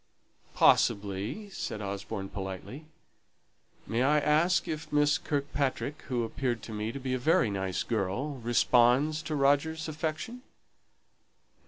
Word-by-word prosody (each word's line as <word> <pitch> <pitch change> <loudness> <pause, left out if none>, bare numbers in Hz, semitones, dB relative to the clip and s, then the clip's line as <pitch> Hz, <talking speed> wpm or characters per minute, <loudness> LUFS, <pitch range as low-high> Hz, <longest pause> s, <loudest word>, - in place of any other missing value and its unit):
"Possibly," 100 - +2
said 110 - -4
Osborne, 100 0 -5
politely. 100 - -7 1.0
"May 115 +2 -1
I 145 +3 +4
ask 155 +5 +2
if 155 -2 -5
Miss 145 0 +3
Kirkpatrick, 140 0 -2
who 120 -2 0
appeared 120 0 -2
to 110 - -8
me 105 +1 -2
to 140 - -6
be 130 -1 -3
a 130 - 0
very 125 -5 +3
nice 95 -2 -2
girl, 120 +7 -2
responds 125 +5 +3
to 155 - -3
Roger's 145 +3 +2
affection?" 155 +10 -4
130 Hz, 125 wpm, -29 LUFS, 110-150 Hz, 1.0 s, I